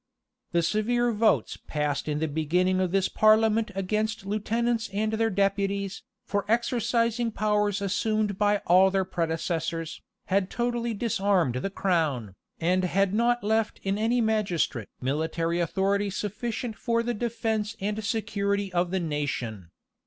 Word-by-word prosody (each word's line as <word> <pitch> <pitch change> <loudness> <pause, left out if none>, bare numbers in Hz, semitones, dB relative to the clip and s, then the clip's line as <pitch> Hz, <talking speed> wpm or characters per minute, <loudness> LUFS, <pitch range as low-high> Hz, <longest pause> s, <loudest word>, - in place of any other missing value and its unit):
The 170 -1 +2
severe 240 +6 +1
votes 220 0 +1
passed 150 -1 -1
in 150 -1 -1
the 160 +1 0
beginning 175 +5 +1
of 185 -1 +1
this 195 +1 +2
parliament 220 +1 +4
against 215 +2 -1
lieutenants 225 +3 -1
and 215 +2 -1
their 225 0 +1
deputies, 200 0 0 0.2
for 200 -1 -1
exercising 235 0 +1
powers 210 -1 0
assumed 210 0 0
by 205 -1 +2
all 185 +2 +6
their 190 0 0
predecessors, 165 -1 -2 0.2
had 195 -1 +1
totally 240 -1 -1
disarmed 195 - +1
the 195 - -2
crown, 160 - 0 0.3
and 180 +3 +2
had 195 +2 +1
not 240 +2 +2
left 220 +1 0
in 195 +1 -1
any 235 +3 +2
magistrate 195 - 0
military 160 +5 -1
authority 195 +4 +1
sufficient 220 +3 -4
for 230 0 0
the 240 +1 -1
defence 225 -1 -2
and 210 +2 -2
security 205 -3 -1
of 175 0 +1
the 190 +1 0
nation. 135 - -3
200 Hz, 140 wpm, -27 LUFS, 180-220 Hz, 0.3 s, all